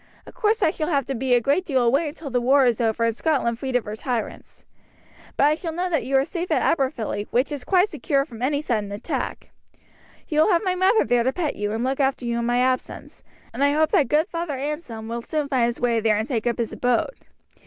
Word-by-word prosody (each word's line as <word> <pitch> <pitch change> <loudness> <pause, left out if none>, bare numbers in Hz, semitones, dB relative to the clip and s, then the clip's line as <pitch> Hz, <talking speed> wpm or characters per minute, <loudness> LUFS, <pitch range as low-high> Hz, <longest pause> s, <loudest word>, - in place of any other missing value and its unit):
Of - - -13
course 430 +1 +1
I 315 - +4
shall 310 -3 -3
have 280 -6 +1
to 275 - -3
be 255 0 +1
a - - +4
great 285 +9 +1
deal 265 -8 +1
away 275 +7 +2
until 295 -2 -9
the 245 0 +1
war 270 +2 +4
is 240 -1 +1
over 225 0 +1
and 230 -1 +1
Scotland 245 -6 0
freed 260 -1 -3
of 250 - +1
her 210 0 -5
tyrants. 235 0 -5 0.7
But - - +3
I 295 - +4
shall 330 +1 -4
know 360 +2 -2
that 315 - +1
you 270 +1 +2
are 270 - +2
safe 345 +2 -4
at - - +1
Aberfilly, 260 -8 -1
which 255 +5 +1
is 285 -3 -5
quite 370 +6 +3
secure 275 -9 0
from 235 -5 -12
any 285 +3 0
sudden 210 -7 -2
attack. 205 +3 -4 0.8
You 305 - 0
will 315 - +4
have 345 +1 +2
my 370 -2 +1
mother 380 +4 +3
there 240 +1 +2
to 255 +3 +1
pet 320 -1 -2
you 205 0 -2
and 225 +2 -2
look 265 +2 -1
after 265 -2 0
you 235 0 -1
in 235 - -1
my 240 0 +1
absence, 255 +1 -2 0.3
and - - -1
I 285 0 +3
hope 310 +1 +2
that 285 - +3
good 305 +6 +2
Father 335 -5 -4
Anselm 265 -6 -5
will 235 +1 -4
soon 300 +3 -2
find 255 -4 +2
his 240 - -4
way 235 -2 +1
there 215 -1 +2
and 220 +2 -2
take 240 -3 -2
up 235 - 0
his 230 -2 -3
abode. 245 - 0
265 Hz, 250 wpm, -23 LUFS, 235-305 Hz, 0.8 s, I